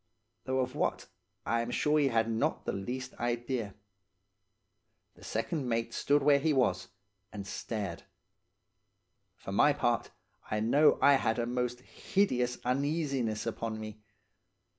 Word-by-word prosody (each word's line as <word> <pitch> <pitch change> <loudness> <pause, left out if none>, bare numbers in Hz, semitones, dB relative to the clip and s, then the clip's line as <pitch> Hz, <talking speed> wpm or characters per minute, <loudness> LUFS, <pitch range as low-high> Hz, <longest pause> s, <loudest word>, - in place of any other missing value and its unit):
Though 130 0 +1
of 130 0 -3
what, 150 - -1 0.4
I 115 0 +1
am 115 - -4
sure 150 +4 +2
he 145 - +3
had 115 -3 +2
not 115 0 -1
the - - 0
least 125 +6 -4
idea. 120 -3 -2 1.4
The - - -18
second 130 +4 -2
mate 115 0 -1
stood 145 0 +2
where 140 0 +5
he 155 +2 +2
was, 130 -3 +1 0.4
and 100 -2 -6
stared. 100 -3 -4 1.3
For 95 - -8
my 145 +9 +5
part, 120 -4 0 0.4
I 105 - 0
know 140 +8 +4
I 140 -1 +7
had 110 -3 0
a 120 - 0
most 125 0 -2
hideous 125 -7 0
uneasiness 135 -4 0
upon 115 -1 -3
me. 110 0 -8
125 Hz, 140 wpm, -31 LUFS, 115-140 Hz, 1.4 s, I